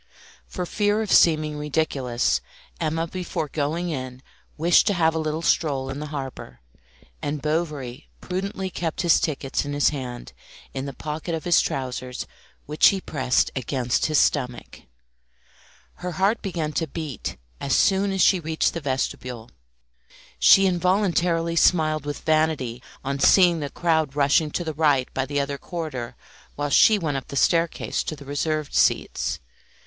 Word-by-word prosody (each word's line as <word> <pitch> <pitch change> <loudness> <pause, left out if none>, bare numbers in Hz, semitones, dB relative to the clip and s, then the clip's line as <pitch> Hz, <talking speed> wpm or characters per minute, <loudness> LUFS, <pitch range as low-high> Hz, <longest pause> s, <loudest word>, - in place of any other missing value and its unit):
For 180 - -4
fear 210 +3 +1
of 210 - -4
seeming 155 -2 +4
ridiculous, 140 -5 0 0.4
Emma 160 0 -1
before 170 -2 -4
going 160 +5 -2
in 130 -3 -5 0.3
wished 170 +5 +4
to 205 - +2
have 165 -2 +3
a 160 - -1
little 155 +1 -2
stroll 135 -5 +1
in 135 - -5
the 150 - -5
harbour, 135 - -7 0.6
and 145 +1 -2
Bovary 150 -4 -3
prudently 190 +1 -4
kept 165 -3 -3
his 170 -2 +5
tickets 140 -3 -2
in 145 0 -5
his 145 0 +3
hand, 125 -4 -6 0.4
in 135 +1 -4
the 140 - -6
pocket 155 +2 -4
of 160 - -5
his 175 -1 +4
trousers, 130 -1 -4 0.4
which 150 +1 +4
he 195 - +3
pressed 130 -8 0
against 125 -1 0
his 155 -1 +1
stomach. 125 -5 0 1.2
Her 180 0 -5
heart 195 +6 +1
began 165 -6 -3
to 165 - -1
beat 155 - -5 0.2
as 140 -1 0
soon 195 0 +3
as 190 -1 0
she 185 +2 +5
reached 160 -1 0
the 170 - -4
vestibule. 125 -4 -3 0.9
She 195 - +7
involuntarily 175 -2 +1
smiled 155 -3 +3
with 145 - -4
vanity 155 -7 0 0.2
on 140 +1 -2
seeing 175 +2 +5
the 145 -2 -4
crowd 160 -4 0
rushing 145 +2 +3
to 175 - -3
the 160 -2 -4
right 145 -4 +1
by 135 0 -1
the 145 0 -1
other 140 0 -2
corridor 130 -8 -5 0.4
while 145 0 -2
she 215 +9 +6
went 155 -7 -2
up 135 - -7
the - - -8
staircase 165 +4 +1
to 155 - -3
the 140 -1 -13
reserved 150 +1 -2
seats. - - +1
155 Hz, 155 wpm, -24 LUFS, 140-170 Hz, 1.2 s, She